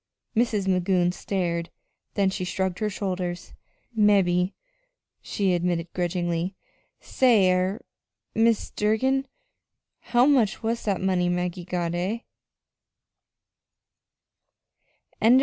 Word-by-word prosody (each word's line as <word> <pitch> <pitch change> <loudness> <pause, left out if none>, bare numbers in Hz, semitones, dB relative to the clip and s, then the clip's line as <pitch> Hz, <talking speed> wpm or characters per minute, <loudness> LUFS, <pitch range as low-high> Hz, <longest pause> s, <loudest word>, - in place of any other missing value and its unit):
Mrs. 220 -4 +1
Magoon 180 -1 +2
stared, 170 -4 -2 0.5
then 195 -2 +2
she 185 - -3
shrugged 185 0 -2
her 215 - 0
shoulders. 180 -3 -4 0.4
"Mebbe," 195 -4 +3 0.7
she 195 -3 0
admitted 175 -1 -1
grudgingly. 175 0 -1 0.4
"Say 220 -8 +3
er 185 +3 0 0.5
Mis' 225 -1 +2
Durgin, 260 +6 +1 0.7
how 240 +1 +3
much 245 -7 +2
was 230 +1 -2
that 200 -3 0
money 185 -2 +1
Maggie 180 0 -2
got 175 -2 -2
eh?" 190 +7 -2
190 Hz, 95 wpm, -25 LUFS, 180-215 Hz, 0.7 s, Mebbe